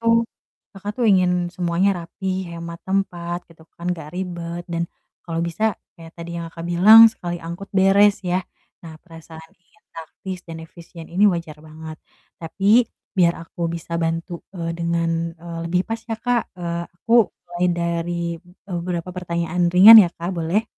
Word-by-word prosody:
itu 230 Hz, 0 st, +3 dB, 0.5 s
Kakak 200 Hz, +2 st, -5 dB
tuh 240 Hz, -, +2 dB
ingin 180 Hz, -2 st, +2 dB
semuanya 175 Hz, +2 st, +1 dB, 0.2 s
rapih, 190 Hz, +1 st, -4 dB
hemat 170 Hz, 0 st, -7 dB
tempat 175 Hz, -3 st, -2 dB
gitu 165 Hz, -1 st, -19 dB, 0.2 s
kan, 170 Hz, -, -8 dB
gak 155 Hz, -2 st, -10 dB
ribet 175 Hz, -1 st, -5 dB
dan 170 Hz, 0 st, -2 dB, 0.4 s
kalau 165 Hz, -1 st, -4 dB
bisa 170 Hz, +6 st, -4 dB, 0.3 s
kayak 165 Hz, -2 st, -13 dB
tadi 170 Hz, 0 st, -7 dB
yang 165 Hz, -1 st, -6 dB
Kakak 165 Hz, 0 st, -8 dB
bilang 215 Hz, +6 st, +9 dB
sekali 175 Hz, -5 st, -6 dB
angkut 170 Hz, +4 st, -7 dB
beres 195 Hz, +2 st, +4 dB
ya. 180 Hz, +1 st, 0 dB, 0.4 s
Nah 165 Hz, -, -9 dB
perasaan 160 Hz, -1 st, -13 dB
ingin 180 Hz, +4 st, -34 dB
taktis 180 Hz, +3 st, -8 dB
dan 165 Hz, -1 st, -9 dB
efisien 165 Hz, 0 st, -13 dB
ini 190 Hz, +4 st, +2 dB
wajar 170 Hz, -4 st, -4 dB
banget, 155 Hz, 0 st, -10 dB, 0.4 s
tapi 200 Hz, +8 st, +3 dB, 0.3 s
biar 175 Hz, -2 st, +3 dB
aku 170 Hz, +1 st, -5 dB
bisa 170 Hz, 0 st, -6 dB
bantu, 165 Hz, +1 st, -3 dB, 0.2 s
eee, 165 Hz, -1 st, -3 dB
dengan, 170 Hz, 0 st, -1 dB, 0.3 s
eee, 170 Hz, 0 st, -8 dB
lebih 180 Hz, +1 st, +2 dB
pas 225 Hz, 0 st, -3 dB
ya -, -, 0 dB
Kak, 245 Hz, 0 st, -1 dB
eee, 170 Hz, -1 st, -3 dB
aku 205 Hz, +6 st, -9 dB, 0.3 s
mulai 175 Hz, +1 st, -2 dB
dari, 170 Hz, 0 st, -2 dB, 0.3 s
eee, 180 Hz, +1 st, -10 dB
beberapa 175 Hz, 0 st, -4 dB
pertanyaan 175 Hz, -1 st, -1 dB
ringan 210 Hz, +5 st, +11 dB
ya 180 Hz, -, +1 dB
Kak, 170 Hz, +2 st, -4 dB
boleh? 170 Hz, +5 st, 0 dB
175 Hz, 160 wpm, -21 LUFS, 170-190 Hz, 0.5 s, ringan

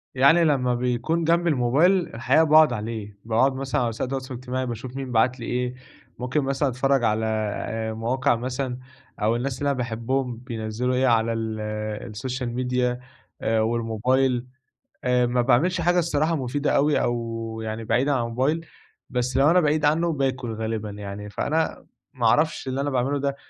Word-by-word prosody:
يعني 150 Hz, +6 st, +5 dB
لمّا 130 Hz, -5 st, +2 dB
بيكون 125 Hz, +7 st, 0 dB
جنبي 170 Hz, +1 st, +2 dB
الموبايل، 140 Hz, +6 st, +3 dB, 0.2 s
الحقيقة 130 Hz, +7 st, +3 dB
باقعد 155 Hz, -3 st, +6 dB
عليه، 105 Hz, -2 st, -5 dB
باقعد 115 Hz, +4 st, +3 dB
مثلًا 135 Hz, -1 st, -1 dB
على 120 Hz, -, +1 dB
وسائل 115 Hz, +3 st, -3 dB
التواصل 130 Hz, -1 st, -4 dB
الاجتماعي، 130 Hz, +1 st, -3 dB
باشوف 120 Hz, +1 st, -6 dB
مين 135 Hz, -2 st, -5 dB
بعت 125 Hz, +3 st, +2 dB
لي 115 Hz, -, -6 dB
إيه، 125 Hz, 0 st, -2 dB, 0.4 s
ممكن 130 Hz, +4 st, 0 dB
مثلًا 135 Hz, +1 st, 0 dB
أتفرّج 135 Hz, 0 st, +1 dB
على 110 Hz, 0 st, +1 dB, 0.7 s
مواقع 120 Hz, +2 st, +1 dB
مثلًا، 125 Hz, +1 st, -3 dB, 0.4 s
أو 110 Hz, +2 st, +2 dB
الناس 125 Hz, +2 st, -3 dB
اللي 145 Hz, -, 0 dB
أنا 140 Hz, -, 0 dB
باحبهم 120 Hz, +1 st, -2 dB
بينزّلوا 120 Hz, 0 st, -3 dB
إيه 130 Hz, +1 st, +2 dB
على 115 Hz, -1 st, +3 dB
ال 110 Hz, -1 st, -3 dB, 0.5 s
السوشيال 125 Hz, +3 st, -4 dB
ميديا 125 Hz, 0 st, 0 dB, 0.4 s
والموبايل، 115 Hz, +3 st, +1 dB, 0.6 s
آآ 125 Hz, -1 st, +3 dB
ما 120 Hz, 0 st, +1 dB
باعملش 170 Hz, +9 st, +2 dB
حاجة 175 Hz, +1 st, +3 dB
الصراحة 160 Hz, 0 st, +1 dB
مُفيدة 145 Hz, +2 st, -1 dB
أوي 145 Hz, +1 st, +3 dB
أو 115 Hz, -1 st, -3 dB
يعني 110 Hz, +1 st, -4 dB
بعيدًا 135 Hz, +5 st, +2 dB
عن 125 Hz, -4 st, +1 dB
الموبايل، 135 Hz, +8 st, -1 dB, 0.4 s
بس 125 Hz, +1 st, -1 dB
لو 140 Hz, +3 st, +5 dB
أنا 180 Hz, -, +5 dB
بعيد 155 Hz, -2 st, +2 dB
عنّه 165 Hz, +3 st, +2 dB
باكل 130 Hz, -5 st, -1 dB
غالبًا 110 Hz, -1 st, -3 dB
يعني، 105 Hz, 0 st, -7 dB
فأنا 160 Hz, +9 st, -1 dB, 0.3 s
ما 120 Hz, -2 st, -2 dB
أعرفش 150 Hz, +3 st, +2 dB
اللي 130 Hz, +1 st, -1 dB
أنا 145 Hz, -, -1 dB
باعمله 135 Hz, +2 st, 0 dB
ده، 140 Hz, 0 st, -1 dB
125 Hz, 165 wpm, -24 LUFS, 115-140 Hz, 0.7 s, باقعد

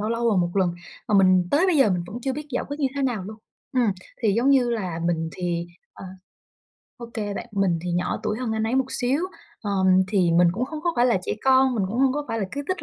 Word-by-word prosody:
lâu 215 Hz, -, -2 dB
lâu 230 Hz, 0 st, +1 dB
là 210 Hz, -, +2 dB
1 175 Hz, -1 st, +1 dB
lần, 180 Hz, -3 st, +2 dB, 0.3 s
mà 210 Hz, -, +1 dB
mình 185 Hz, -2 st, +4 dB
tới 320 Hz, +6 st, +3 dB
bây 365 Hz, -4 st, +2 dB
giờ 270 Hz, -7 st, +5 dB
mình 175 Hz, -2 st, -1 dB
vẫn 210 Hz, +7 st, -7 dB
chưa 265 Hz, +1 st, -1 dB
biết 300 Hz, +2 st, -6 dB
giải 250 Hz, -, -2 dB
quyết 285 Hz, +2 st, -5 dB
như 275 Hz, -, +2 dB
thế 280 Hz, -, -1 dB
nào 245 Hz, -7 st, -1 dB
luôn. 215 Hz, +3 st, -8 dB, 0.4 s
Ừm, 240 Hz, -5 st, +2 dB, 0.3 s
thì, 215 Hz, -3 st, +3 dB
giống 240 Hz, +6 st, +2 dB
như 255 Hz, -3 st, +4 dB
là, 185 Hz, -8 st, -3 dB
mình 165 Hz, -1 st, 0 dB
thì 175 Hz, -1 st, -3 dB, 0.3 s
ờ, -, -, -10 dB, 0.9 s
ô 235 Hz, -, -8 dB
kê 205 Hz, -2 st, -3 dB
bạn, -, -, -5 dB
mình 195 Hz, -4 st, +1 dB
thì 180 Hz, -, -3 dB
nhỏ 175 Hz, +1 st, -1 dB
tuổi 210 Hz, +1 st, -2 dB
hơn 245 Hz, -3 st, -2 dB
anh 220 Hz, 0 st, -1 dB
ấy 230 Hz, -, -1 dB
một 265 Hz, 0 st, +3 dB
xíu, 260 Hz, +4 st, 0 dB, 0.4 s
ờ, 205 Hz, -, -3 dB, 0.4 s
thì 185 Hz, -4 st, +2 dB
mình 175 Hz, +1 st, +5 dB
cũng 230 Hz, +7 st, -1 dB
không 305 Hz, +3 st, -7 dB
có 345 Hz, 0 st, +1 dB
phải 240 Hz, +1 st, +4 dB
là 235 Hz, -6 st, +3 dB
trẻ -, -, -2 dB
con, 265 Hz, -1 st, +4 dB
mình 210 Hz, -5 st, 0 dB
cũng 225 Hz, +5 st, -3 dB
không 265 Hz, 0 st, +4 dB
có 295 Hz, +1 st, -3 dB
phải 225 Hz, -, -2 dB
là 210 Hz, -, -1 dB
cứ 285 Hz, -, -3 dB
thích 370 Hz, -1 st, -2 dB
225 Hz, 270 wpm, -24 LUFS, 185-265 Hz, 0.9 s, giờ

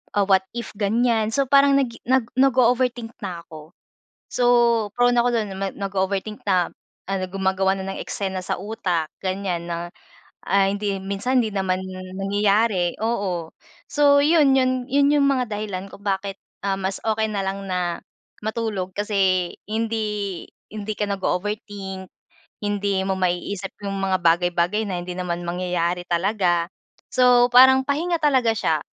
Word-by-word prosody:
Ah, 200 Hz, -1 st, +3 dB
what 190 Hz, -1 st, +4 dB, 0.2 s
if 235 Hz, -, -5 dB
ganyan? 220 Hz, +1 st, +1 dB
So, 275 Hz, -1 st, +2 dB
parang 280 Hz, 0 st, +6 dB
nagi, 240 Hz, -4 st, -2 dB
nag 260 Hz, -2 st, +3 dB
nag-o-overthink 250 Hz, -2 st, +2 dB
na 180 Hz, -4 st, -5 dB
ako. 155 Hz, +1 st, -12 dB, 0.6 s
So, 245 Hz, -, 0 dB, 0.5 s
prone 245 Hz, 0 st, +4 dB
na 235 Hz, -, +5 dB
ako -, -, +3 dB
do'n 210 Hz, -2 st, -2 dB, 0.3 s
nag-o-overthink 195 Hz, +1 st, -2 dB
na 185 Hz, -3 st, +2 dB, 0.4 s
ano 195 Hz, -1 st, -2 dB
gumagawa 190 Hz, 0 st, +1 dB
na 190 Hz, 0 st, -4 dB
ng -, -, -6 dB
eksena 190 Hz, -2 st, -3 dB
sa -, -, -2 dB
utak, 185 Hz, -6 st, -2 dB, 0.2 s
ganyan 185 Hz, -3 st, -2 dB
na, 170 Hz, +1 st, -3 dB, 0.6 s
ah, 195 Hz, +1 st, +4 dB
hindi 200 Hz, 0 st, -1 dB
minsan, 200 Hz, +7 st, 0 dB
hindi 215 Hz, -, -4 dB
naman 190 Hz, -1 st, 0 dB, 0.4 s
nangyayari, 200 Hz, -2 st, +1 dB
oo, 185 Hz, -8 st, -2 dB, 0.4 s
so, 285 Hz, -1 st, +4 dB
'yun,' 300 Hz, -4 st, +5 dB
yun, 255 Hz, -1 st, +1 dB
'yun, 285 Hz, +1 st, +4 dB
yung 280 Hz, -1 st, +4 dB
mga 260 Hz, -2 st, +2 dB
dahilan 200 Hz, -2 st, -4 dB
kung -, -, -12 dB
bakit, 195 Hz, 0 st, -2 dB, 0.3 s
ah, 195 Hz, -1 st, 0 dB
mas 190 Hz, +1 st, -3 dB
okay 220 Hz, 0 st, +1 dB
na 200 Hz, -2 st, -2 dB
lang 195 Hz, +1 st, -3 dB
na, 175 Hz, -2 st, -2 dB, 0.4 s
matulog 215 Hz, -4 st, -2 dB
kasi, 190 Hz, -4 st, +1 dB, 0.2 s
hindi 215 Hz, -4 st, -2 dB, 0.2 s
hindi 215 Hz, 0 st, -5 dB
ka 210 Hz, -, 0 dB
nag-o-overthink, 195 Hz, -1 st, -3 dB, 0.5 s
hindi 200 Hz, -2 st, 0 dB
mo 190 Hz, 0 st, 0 dB
maiisip 185 Hz, +2 st, -2 dB
yung 195 Hz, 0 st, -3 dB
mga 190 Hz, -1 st, 0 dB
bagay-bagay 175 Hz, +5 st, +2 dB
na 180 Hz, -2 st, -3 dB
hindi 180 Hz, -, -6 dB
naman 175 Hz, -1 st, -3 dB
mangyayari 175 Hz, 0 st, -1 dB
talaga, 175 Hz, -1 st, +1 dB, 0.4 s
so, 250 Hz, 0 st, +5 dB
parang 260 Hz, +1 st, +7 dB
pahinga 335 Hz, +5 st, 0 dB
talaga 255 Hz, -6 st, +3 dB
siya, -, -, +1 dB
200 Hz, 145 wpm, -23 LUFS, 185-230 Hz, 0.6 s, parang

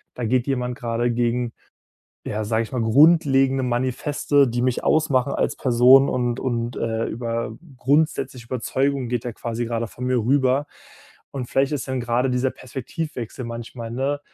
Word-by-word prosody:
da 125 Hz, -, -3 dB
geht 125 Hz, +3 st, +1 dB
jemand 125 Hz, -2 st, -2 dB
grade 120 Hz, 0 st, -1 dB
gegen, 120 Hz, 0 st, 0 dB, 0.7 s
ja, 110 Hz, +1 st, -3 dB
sag 110 Hz, +1 st, 0 dB
ich 110 Hz, -, -7 dB
mal, 125 Hz, -, -1 dB
grundlegende 135 Hz, 0 st, +4 dB
Manifeste, 130 Hz, +3 st, +1 dB
die 120 Hz, +1 st, -1 dB
mich 130 Hz, -1 st, 0 dB
ausmachen 140 Hz, -4 st, +2 dB
als -, -, 0 dB
Person, 130 Hz, +2 st, +6 dB
und 120 Hz, -1 st, -1 dB
und, 120 Hz, -2 st, -2 dB
äh, 115 Hz, 0 st, -1 dB
über 115 Hz, -1 st, -3 dB, 0.2 s
grundsätzliche 135 Hz, -3 st, 0 dB
Überzeugungen 130 Hz, +1 st, -1 dB
geht 120 Hz, -2 st, -1 dB
der 120 Hz, -3 st, -4 dB
quasi 115 Hz, 0 st, -4 dB
grade 115 Hz, 0 st, -2 dB
von 125 Hz, -, -8 dB
mir 130 Hz, 0 st, +1 dB
rüber.“ 130 Hz, +4 st, +2 dB, 0.7 s
Und 125 Hz, -3 st, -3 dB
vielleicht 135 Hz, +2 st, +1 dB
ist 140 Hz, -2 st, -3 dB
dann 130 Hz, -1 st, -1 dB
grade 120 Hz, +2 st, 0 dB
dieser 125 Hz, +1 st, +1 dB
Perspektivwechsel 130 Hz, -1 st, -6 dB
manchmal, 115 Hz, 0 st, -7 dB
ne 135 Hz, +4 st, -1 dB
125 Hz, 160 wpm, -23 LUFS, 115-135 Hz, 0.7 s, Person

